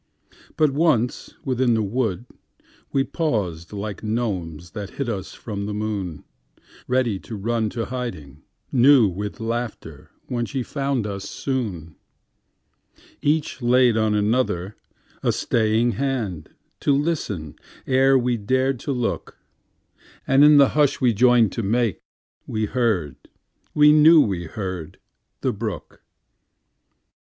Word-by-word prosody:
But 155 Hz, -2 st, +3 dB
once 135 Hz, -5 st, 0 dB
within 125 Hz, -2 st, +2 dB
the 110 Hz, -, +1 dB
wood, 110 Hz, 0 st, -2 dB, 0.7 s
we 135 Hz, -, +2 dB
pausedLike 105 Hz, -, -3 dB
gnomes 90 Hz, -8 st, -3 dB
that 105 Hz, -1 st, -6 dB
hid 140 Hz, -, -2 dB
us 100 Hz, -5 st, -4 dB
from 100 Hz, -3 st, -5 dB
the 105 Hz, -, -4 dB
moon, 100 Hz, -7 st, -4 dB, 0.6 s
Ready 125 Hz, -6 st, +1 dB
to 110 Hz, -, -8 dB
run 110 Hz, +2 st, -1 dB
to 115 Hz, +1 st, -3 dB
hiding 115 Hz, -, -6 dB, 0.3 s
newWith 115 Hz, -7 st, +4 dB
laughter 115 Hz, -10 st, -5 dB, 0.2 s
when 120 Hz, -2 st, -2 dB
she 135 Hz, -3 st, -3 dB
found 135 Hz, -4 st, -2 dB
us 100 Hz, -1 st, -5 dB
soon. 100 Hz, -, -4 dB, 1.2 s
Each 150 Hz, -3 st, 0 dB
laid 125 Hz, -1 st, +4 dB
on 105 Hz, -1 st, +2 dB
other 100 Hz, -6 st, -1 dB, 0.5 s
a -, -, +2 dB
staying 115 Hz, +1 st, +1 dB
handTo 110 Hz, -, -3 dB, 0.5 s
listen 105 Hz, -, -3 dB, 0.3 s
ere 135 Hz, +1 st, +4 dB
we 125 Hz, -1 st, 0 dB
dared 130 Hz, +4 st, 0 dB
to 140 Hz, -, -4 dB
look, 125 Hz, -3 st, -3 dB, 0.9 s
And 135 Hz, +2 st, +5 dB
in 150 Hz, 0 st, +8 dB
the 140 Hz, -2 st, +6 dB
hush 150 Hz, -2 st, +2 dB
we 125 Hz, -2 st, +3 dB
joined 120 Hz, -1 st, +4 dB
to 115 Hz, -, -3 dB
makeWe 110 Hz, 0 st, -3 dB
heard—we 120 Hz, -, 0 dB
knew 155 Hz, +2 st, +7 dB
we 95 Hz, -, +1 dB
heard—the 90 Hz, -2 st, -6 dB
brook. -, -, -6 dB
115 Hz, 115 wpm, -23 LUFS, 100-130 Hz, 1.2 s, in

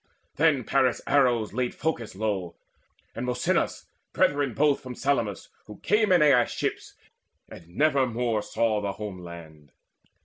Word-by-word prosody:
Then 150 Hz, -4 st, +3 dB
Paris' 130 Hz, 0 st, +1 dB
arrows 120 Hz, -7 st, +2 dB
laid 125 Hz, +1 st, -2 dB
proud 160 Hz, 0 st, 0 dB
Phorcys 115 Hz, -5 st, -9 dB
low, 95 Hz, -4 st, -3 dB, 0.6 s
And -, -, -5 dB
Mosynus, 125 Hz, -, -1 dB, 0.3 s
brethren 140 Hz, -5 st, +1 dB
both, 145 Hz, -1 st, +2 dB
from 125 Hz, -1 st, -8 dB
Salamis 120 Hz, -8 st, -1 dB, 0.2 s
Who 105 Hz, -1 st, -10 dB
came 210 Hz, -1 st, +2 dB
in 175 Hz, -4 st, +5 dB
Aias' 135 Hz, -5 st, +4 dB
ships, -, -, -4 dB, 0.5 s
and 85 Hz, -, -13 dB
nevermore 125 Hz, -, +1 dB
Saw 110 Hz, 0 st, 0 dB
the 100 Hz, -1 st, -3 dB
home 100 Hz, -3 st, -7 dB
land. 80 Hz, -5 st, -12 dB
120 Hz, 140 wpm, -26 LUFS, 105-140 Hz, 0.6 s, in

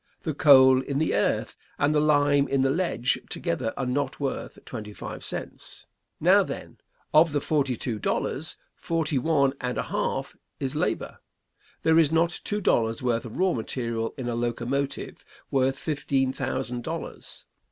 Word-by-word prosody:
The 155 Hz, -, -2 dB
coal 130 Hz, -3 st, +7 dB
in 140 Hz, +1 st, -3 dB
the 155 Hz, +1 st, +1 dB
earth -, -, 0 dB, 0.2 s
and 145 Hz, +1 st, +2 dB
the 150 Hz, -, +3 dB
lime 145 Hz, -1 st, +3 dB
in 135 Hz, -1 st, +1 dB
the 135 Hz, -, +3 dB
ledge 160 Hz, -7 st, 0 dB
together 100 Hz, +6 st, -2 dB
are -, -, -1 dB
not 130 Hz, +1 st, -1 dB
worth 140 Hz, -2 st, -3 dB
twenty 105 Hz, -4 st, -7 dB
five -, -, -7 dB
cents. -, -, -7 dB, 0.3 s
Now, -, -, +6 dB
then, -, -, -6 dB, 0.3 s
of 155 Hz, 0 st, +6 dB
the 145 Hz, -, +2 dB
forty 140 Hz, -3 st, 0 dB
two 115 Hz, -5 st, -3 dB
dollars, -, -, -1 dB, 0.2 s
forty 160 Hz, -4 st, -1 dB
one 140 Hz, -1 st, +2 dB
and 125 Hz, -1 st, -2 dB
a -, -, 0 dB
half -, -, -2 dB, 0.2 s
is 135 Hz, 0 st, -2 dB
labor. 155 Hz, -, -2 dB, 0.6 s
There 160 Hz, 0 st, +5 dB
is 155 Hz, -2 st, +4 dB
not 165 Hz, +1 st, +1 dB
two 210 Hz, 0 st, -2 dB
dollars' 115 Hz, -, +1 dB
worth 120 Hz, -2 st, 0 dB
of 115 Hz, -, -8 dB
raw 185 Hz, -1 st, +2 dB
material 115 Hz, -1 st, -3 dB
in 130 Hz, -3 st, -4 dB
a 120 Hz, -, -1 dB
locomotive 120 Hz, +4 st, -2 dB, 0.3 s
worth 135 Hz, 0 st, +2 dB
fifteen 135 Hz, -3 st, 0 dB
thousand 130 Hz, -2 st, -3 dB
dollars. -, -, -6 dB
135 Hz, 165 wpm, -26 LUFS, 125-150 Hz, 0.6 s, coal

